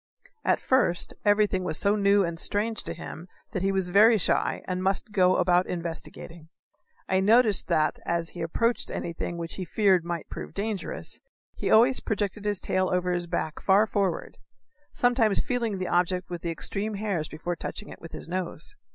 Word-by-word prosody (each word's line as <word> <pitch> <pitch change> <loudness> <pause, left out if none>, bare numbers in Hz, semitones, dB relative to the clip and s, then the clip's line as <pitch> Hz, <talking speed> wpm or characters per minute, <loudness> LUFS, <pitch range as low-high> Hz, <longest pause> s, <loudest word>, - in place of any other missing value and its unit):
At - - +2
first 245 -10 +1
everything 205 -2 +3
was 160 - 0
so 200 +1 +2
new 200 -1 +3
and 170 -1 -4
strange 215 +4 +1
to - - -2
him 170 +3 -8 0.2
that 185 - -3
he 195 +1 +1
was 190 -2 -1
very 215 +5 +6
shy 185 - 0
and 185 0 -3
must 195 +3 0
go 185 -3 +4
about 180 0 +3
investigating. 165 -1 -6 0.6
I 190 - +2
noticed 215 +1 +5
that, 155 -3 +1
as 170 -1 -1
he 175 - -8
approached 230 +8 0
anything 170 0 -4
which 170 -1 -5
he 190 - -3
feared 190 0 +2
might 170 -2 -4
prove - - -8
dangerous, 205 -1 -4 0.3
he - - -3
always 245 +4 +5
projected 210 -1 -3
his 205 -2 0
tail 185 0 0
over 180 0 0
his 175 -1 -2
back 160 -2 -3
far 200 +2 +4
forward 200 -4 -2 0.5
sometimes 240 -4 +2
feeling 235 -5 -1
the 185 -1 -3
object 180 0 0
with 175 -1 -5
the 170 - -3
extreme 205 +5 -3
hairs 195 -7 -2
before 175 +3 -4
touching 210 - -6
it - - -11
with 165 - -10
his - - -7
nose. 185 - -3
185 Hz, 180 wpm, -26 LUFS, 175-210 Hz, 0.6 s, very